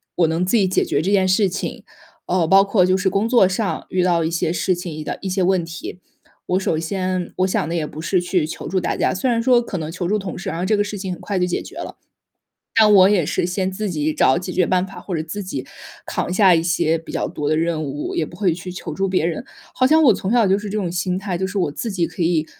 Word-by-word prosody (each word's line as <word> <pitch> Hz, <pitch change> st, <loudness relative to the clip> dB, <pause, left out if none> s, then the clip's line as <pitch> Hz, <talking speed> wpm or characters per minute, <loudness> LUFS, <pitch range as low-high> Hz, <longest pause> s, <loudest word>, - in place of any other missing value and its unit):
我 170 Hz, -, +3 dB
能 165 Hz, +3 st, 0 dB
自 225 Hz, +6 st, +2 dB
己 195 Hz, -3 st, +3 dB
解 185 Hz, -, +1 dB
决 145 Hz, -, 0 dB
这 185 Hz, -, -1 dB
件 195 Hz, -2 st, +3 dB
事 190 Hz, +2 st, +3 dB
情。 185 Hz, -, -5 dB, 0.4 s
呃， 180 Hz, -2 st, +2 dB
包 195 Hz, +3 st, +6 dB
括 195 Hz, -2 st, +3 dB
就 185 Hz, +1 st, +2 dB
是 190 Hz, 0 st, +1 dB
工 200 Hz, +4 st, 0 dB
作 235 Hz, -6 st, +5 dB
上 190 Hz, +2 st, -2 dB
遇 185 Hz, -1 st, +1 dB
到 170 Hz, -2 st, +2 dB
一 -, -, 0 dB
些 165 Hz, -1 st, 0 dB
事 180 Hz, +2 st, +1 dB
情 175 Hz, -1 st, -6 dB
遇 155 Hz, 0 st, -6 dB
到 -, -, -3 dB
一 195 Hz, -, -3 dB
些 190 Hz, +1 st, 0 dB
问 185 Hz, -1 st, +2 dB
题。 165 Hz, +2 st, -8 dB, 0.5 s
我 185 Hz, -, +1 dB
首 160 Hz, -4 st, 0 dB
先 185 Hz, +1 st, -2 dB
我 185 Hz, -, +2 dB
想 165 Hz, -4 st, -1 dB
的 170 Hz, -, -2 dB
也 160 Hz, -3 st, -1 dB
不 155 Hz, -, -8 dB
是 180 Hz, +2 st, +1 dB
去 175 Hz, -2 st, 0 dB
求 -, -, -7 dB
助 190 Hz, -, 0 dB
大 -, -, -1 dB
家， -, -, +1 dB
虽 255 Hz, +8 st, -1 dB
然 230 Hz, -1 st, +1 dB
说 245 Hz, -1 st, +5 dB
可 225 Hz, -5 st, -5 dB
能 160 Hz, -1 st, -4 dB
求 175 Hz, 0 st, -3 dB
助 210 Hz, +3 st, +1 dB
同 190 Hz, -2 st, -6 dB
事， 190 Hz, -, -5 dB
然 -, -, -4 dB
后 180 Hz, -, -1 dB
这 210 Hz, +2 st, +2 dB
个 205 Hz, -, +2 dB
事 205 Hz, 0 st, -5 dB
情 190 Hz, -1 st, -4 dB
很 -, -, -10 dB
快 200 Hz, -, -3 dB
就 180 Hz, -, +2 dB
解 175 Hz, -, -2 dB
决 -, -, -11 dB
了。 -, -, -7 dB, 0.8 s
但 215 Hz, -2 st, +6 dB
我 190 Hz, -1 st, +7 dB
也 180 Hz, -7 st, +2 dB
是 -, -, 0 dB
先 185 Hz, +1 st, -1 dB
自 210 Hz, +1 st, -3 dB
己 155 Hz, -2 st, -1 dB
找 130 Hz, -, +3 dB
解 180 Hz, 0 st, -5 dB
决 180 Hz, 0 st, +2 dB
办 185 Hz, 0 st, +1 dB
法， 195 Hz, -, -11 dB
或 190 Hz, -, -5 dB
者 155 Hz, -, -2 dB
自 205 Hz, +6 st, -5 dB
己 135 Hz, -8 st, -5 dB, 0.4 s
扛 -, -, -2 dB
下 190 Hz, -1 st, +5 dB
一 165 Hz, -, +2 dB
些 165 Hz, -1 st, +1 dB
比 165 Hz, -, -11 dB
较 -, -, -1 dB
多 145 Hz, -, -3 dB
的 155 Hz, -, +2 dB
任 165 Hz, -1 st, 0 dB
务， 145 Hz, +1 st, -4 dB
也 160 Hz, -, +1 dB
不 175 Hz, -, -12 dB
会 185 Hz, -3 st, +1 dB
去 180 Hz, +2 st, -7 dB
求 175 Hz, -2 st, -6 dB
助 195 Hz, +4 st, -1 dB
别 185 Hz, -3 st, +1 dB
人。 170 Hz, +7 st, -3 dB, 0.3 s
好 255 Hz, -, +1 dB
像 315 Hz, +3 st, +5 dB
我 235 Hz, -7 st, +6 dB
从 190 Hz, +1 st, -3 dB
小 235 Hz, -3 st, +4 dB
就 195 Hz, -, +4 dB
是 210 Hz, 0 st, -6 dB
这 215 Hz, -, -3 dB
种 185 Hz, -4 st, -2 dB
心 180 Hz, +1 st, -1 dB
态， 195 Hz, -2 st, -3 dB
就 190 Hz, -, -1 dB
是 200 Hz, -, -3 dB
我 175 Hz, -6 st, +1 dB
自 225 Hz, +9 st, -4 dB
己 175 Hz, -3 st, 0 dB
可 180 Hz, -, -5 dB
以 165 Hz, -2 st, +1 dB
185 Hz, 310 characters per minute, -20 LUFS, 170-195 Hz, 0.8 s, 我